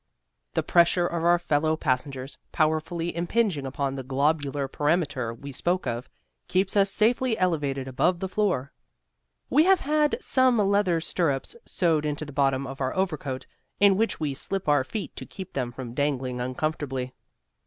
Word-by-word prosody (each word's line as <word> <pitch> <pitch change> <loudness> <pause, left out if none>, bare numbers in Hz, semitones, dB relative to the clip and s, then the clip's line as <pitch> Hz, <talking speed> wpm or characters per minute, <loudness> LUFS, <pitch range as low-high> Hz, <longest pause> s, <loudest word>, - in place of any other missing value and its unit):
The - - 0
pressure 175 0 +4
of 170 -1 -2
our 175 +1 +5
fellow 155 -2 +1
passengers, 130 -1 -2
powerfully 160 +2 0
impinging 170 -4 0
upon 135 +1 -2
the 135 - -4
globular 140 +1 0
perimeter 145 -6 0
we 140 +5 -9
spoke 175 +7 -1
of, 120 0 -3 0.4
keeps 190 +2 +1
us 200 -1 +5
safely 230 +3 +2
elevated 145 -7 0
above 170 +7 +1
the 190 - -2
floor. 185 -9 -1 0.8
We 310 - +5
have 380 -1 +5
had 300 +1 +2
some 260 -2 +3
leather 200 -4 +2
stirrups 160 - -1
sewed 165 -4 +1
into 150 0 -2
the 145 - -10
bottom 135 -1 +1
of 135 +1 -7
our 130 0 -1
overcoat, 155 -8 -2 0.3
in 200 -1 +6
which 225 +3 0
we 150 -3 -1
slip 195 +7 -3
our 145 -2 +4
feet 205 +9 -6
to - - -6
keep 190 -2 -9
them 125 -3 -2
from 120 -1 -7
dangling 130 -3 -1
uncomfortably. 130 -1 -3
155 Hz, 160 wpm, -26 LUFS, 135-185 Hz, 0.8 s, in